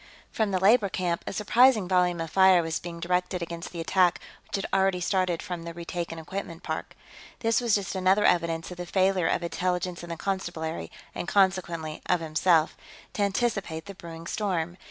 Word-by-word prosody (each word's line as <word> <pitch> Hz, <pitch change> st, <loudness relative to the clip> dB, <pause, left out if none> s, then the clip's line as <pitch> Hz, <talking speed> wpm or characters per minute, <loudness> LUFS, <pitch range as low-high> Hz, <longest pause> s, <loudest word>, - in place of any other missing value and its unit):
From 220 Hz, -2 st, 0 dB
the 190 Hz, -, +1 dB
labor 205 Hz, +2 st, +4 dB
camp, 175 Hz, -2 st, -2 dB
a -, -, -2 dB
surprising 220 Hz, +1 st, +4 dB
volume 180 Hz, -2 st, +2 dB
of 165 Hz, -1 st, -5 dB
fire 190 Hz, -2 st, +6 dB
was 160 Hz, 0 st, -2 dB
being 170 Hz, -1 st, -7 dB
directed 180 Hz, +1 st, -1 dB
against 170 Hz, 0 st, -6 dB
the 170 Hz, -, -7 dB
attack 175 Hz, +1 st, +2 dB, 0.3 s
which -, -, -4 dB
had 195 Hz, -, -2 dB
already 190 Hz, -1 st, +2 dB
started 180 Hz, -2 st, 0 dB
from 180 Hz, -4 st, -5 dB
the 170 Hz, 0 st, -7 dB
retaken 170 Hz, -1 st, -5 dB
equipment 175 Hz, +1 st, -6 dB
park. 160 Hz, -1 st, -5 dB, 0.5 s
This 230 Hz, +1 st, +2 dB
was 235 Hz, -3 st, +3 dB
just 200 Hz, -2 st, -2 dB
another 190 Hz, +2 st, +3 dB
evidence 165 Hz, -1 st, +1 dB
of 180 Hz, -, -8 dB
the 175 Hz, 0 st, -6 dB
failure 190 Hz, -2 st, +2 dB
of -, -, 0 dB
Intelligence 180 Hz, 0 st, -2 dB
and 170 Hz, 0 st, -8 dB
the 165 Hz, -, -4 dB
Constabulary 170 Hz, -4 st, -3 dB, 0.2 s
and -, -, -5 dB
consequently 175 Hz, -5 st, +1 dB
of 180 Hz, -, +3 dB
himself 160 Hz, 0 st, +2 dB, 0.4 s
to -, -, -3 dB
anticipate 200 Hz, -5 st, -1 dB
the 200 Hz, -, -8 dB
brewing 165 Hz, -3 st, -10 dB
storm. 175 Hz, -3 st, -2 dB
180 Hz, 185 wpm, -27 LUFS, 170-195 Hz, 0.5 s, fire